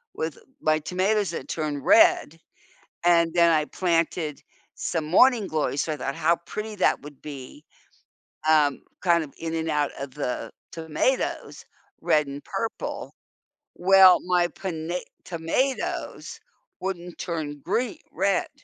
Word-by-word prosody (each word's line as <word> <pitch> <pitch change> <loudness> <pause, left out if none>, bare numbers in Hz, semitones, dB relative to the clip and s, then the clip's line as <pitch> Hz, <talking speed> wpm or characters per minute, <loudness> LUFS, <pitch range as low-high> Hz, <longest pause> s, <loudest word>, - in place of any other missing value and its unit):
with 160 -1 -3 0.2
my 155 0 +2
tomatoes 190 +5 0
that - - -6
turn 150 -3 -3
red, 165 +2 +5 0.7
and 170 -1 +4
then 170 -1 +5
I 155 -1 +2
planted 165 -4 -1 0.3
some 165 -3 -2
morning 220 +5 +4
glories 150 -3 -1
so 155 - -2
I - - -6
thought 135 -1 -3
how 170 - +2
pretty 215 0 -5
that - - +2
would 145 -1 -12
be, 145 0 -9 0.9
um, 150 -3 +4 0.2
kind 170 -2 +3
of 140 - -11
in 165 0 -4
and 160 0 -2
out 150 -2 +1
of 140 -1 -6
the 135 -4 -3 0.2
tomatoes, 165 +11 -2 0.4
red 150 -2 +2
and 140 +1 -7
purple. 230 - -4 0.6
Well, 190 0 +7
my 180 -1 +3
pona 175 -1 -4 0.3
tomatoes 180 +11 -2 0.4
wouldn't 180 -2 -5
turn 155 -4 -4
green 230 +5 -1
red. 195 -1 +1
165 Hz, 130 wpm, -25 LUFS, 150-180 Hz, 0.9 s, Well